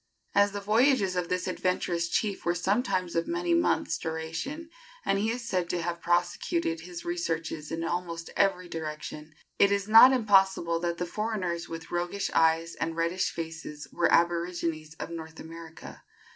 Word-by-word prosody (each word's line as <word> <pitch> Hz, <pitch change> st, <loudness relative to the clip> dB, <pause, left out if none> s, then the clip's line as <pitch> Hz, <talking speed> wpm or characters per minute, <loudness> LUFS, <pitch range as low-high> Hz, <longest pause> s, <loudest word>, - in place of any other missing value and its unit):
As 200 Hz, 0 st, +4 dB
the 205 Hz, -, -3 dB
voyages 215 Hz, -2 st, +3 dB
of 180 Hz, -1 st, -1 dB
this 180 Hz, 0 st, -1 dB
adventurous 180 Hz, -2 st, -1 dB
chief 205 Hz, +1 st, -1 dB
were 175 Hz, 0 st, +1 dB
sometimes 185 Hz, -1 st, 0 dB
of 165 Hz, -, 0 dB
many 350 Hz, 0 st, 0 dB
months' 335 Hz, 0 st, +1 dB
duration, 165 Hz, -, -4 dB, 0.3 s
and 195 Hz, -, +2 dB
he 215 Hz, +2 st, +1 dB
is 235 Hz, 0 st, -3 dB
said 180 Hz, -5 st, -1 dB
to 175 Hz, -, -1 dB
have 170 Hz, 0 st, -3 dB
prosecuted 175 Hz, -, 0 dB
his 175 Hz, +1 st, -9 dB
researches 165 Hz, -3 st, -3 dB
in 165 Hz, 0 st, -2 dB
almost 170 Hz, -1 st, -3 dB
every 185 Hz, -2 st, +2 dB
direction, 155 Hz, -1 st, -6 dB, 0.2 s
it 200 Hz, -, +6 dB
is 200 Hz, 0 st, 0 dB
not 225 Hz, +4 st, +9 dB
impossible 195 Hz, -8 st, +3 dB
that 170 Hz, 0 st, -2 dB
the 180 Hz, -, -2 dB
foreigners 180 Hz, -4 st, -3 dB
with 165 Hz, 0 st, -7 dB
"roguish 175 Hz, +3 st, -2 dB
eyes 165 Hz, +1 st, +3 dB
and 165 Hz, 0 st, -3 dB
reddish 170 Hz, +3 st, 0 dB
faces" 160 Hz, -2 st, -7 dB
were 170 Hz, -, +2 dB
aborigines 170 Hz, -2 st, +1 dB
of 165 Hz, -, -6 dB
North 160 Hz, -1 st, -8 dB
America. 165 Hz, 0 st, -10 dB
175 Hz, 160 wpm, -28 LUFS, 165-200 Hz, 0.3 s, not